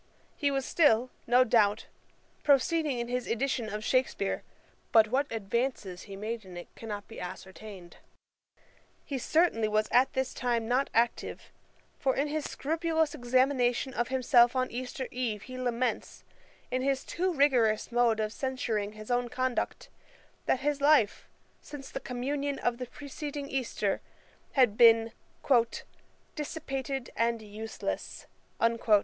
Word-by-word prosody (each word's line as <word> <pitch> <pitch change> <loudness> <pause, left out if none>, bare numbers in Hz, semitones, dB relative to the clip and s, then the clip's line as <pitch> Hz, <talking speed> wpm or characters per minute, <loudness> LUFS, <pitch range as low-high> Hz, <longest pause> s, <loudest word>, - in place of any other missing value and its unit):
He 285 - +1
was 270 -1 -1
still, 255 -6 +3 0.2
no 245 +2 +6
doubt, 220 -3 +3 0.6
proceeding 295 0 +3
in 235 0 -2
his 250 0 -2
edition 235 -1 -1
of 210 +1 -4
Shakespeare; 255 -5 0 0.5
but 220 -1 +6
what 275 +4 0
advances 220 -3 -2
he 195 - -6
made 220 +3 -4
in 185 -2 -10
it 175 - -10
cannot 210 -3 -6
be 225 - -10
ascertained. 185 0 -9 1.1
He 275 -2 -3
certainly 280 -6 +2
was 215 0 +1
at 255 +2 +4
this 265 -1 -1
time 235 -3 -1
not 255 +3 +1
active; 230 +1 0 0.5
for 265 -1 +1
in 285 +2 0
his 305 0 -2
scrupulous 320 0 0
examination 255 -1 +1
of 240 -1 0
himself 250 -1 +4
on 255 0 0
Easter 255 +2 -4
eve, 230 -5 -2
he 255 - -9
laments, 250 0 -2 0.5
in 255 - 0
his 270 0 0
too 365 +2 -1
rigorous 255 -9 +3
mode 235 -2 +3
of 215 0 -1
censuring 230 -7 -2
his 215 +2 -8
own 245 0 +1
conduct, 255 0 -2 0.6
that 265 - +2
his 290 0 0
life, 285 -8 +3 0.3
since 285 -2 -9
the - - -4
communion 275 +3 -2
of 245 0 -1
the 250 - -4
preceding 290 +1 -6
Easter, 245 -7 -1 0.5
had 245 -6 +4
been 230 -1 +6 1.2
'dissipated 275 -4 -4
and 230 -1 0
useless.' 215 +1 -5
250 Hz, 135 wpm, -30 LUFS, 225-275 Hz, 1.2 s, no